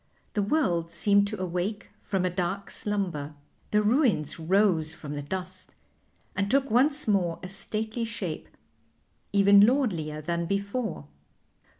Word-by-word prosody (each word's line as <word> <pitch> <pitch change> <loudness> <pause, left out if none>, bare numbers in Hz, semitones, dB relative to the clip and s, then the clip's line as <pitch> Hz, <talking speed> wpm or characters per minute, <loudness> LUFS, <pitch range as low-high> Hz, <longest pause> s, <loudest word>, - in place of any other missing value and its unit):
The 210 - +1
world 190 - +1
seemed 200 +2 +3
to 215 -1 -4
awake 185 +3 -3
from 190 -3 -1
a 180 - 0
dark 185 +2 -3
slumber. 175 -8 -3 0.3
The 210 0 +2
ruins 215 - +2
rose 165 -3 +2
from 150 -4 -7
the 145 - -4
dust 185 +4 -6 0.6
and 195 +1 0
took 275 +1 +2
once 275 +5 +3
more 180 -5 +2
a - - -4
stately 215 +4 -4
shape, 230 0 -5 0.8
even 200 0 +6
lordlier 200 - +1
than 170 +2 -2
before. 200 - -2
195 Hz, 130 wpm, -27 LUFS, 170-215 Hz, 0.8 s, even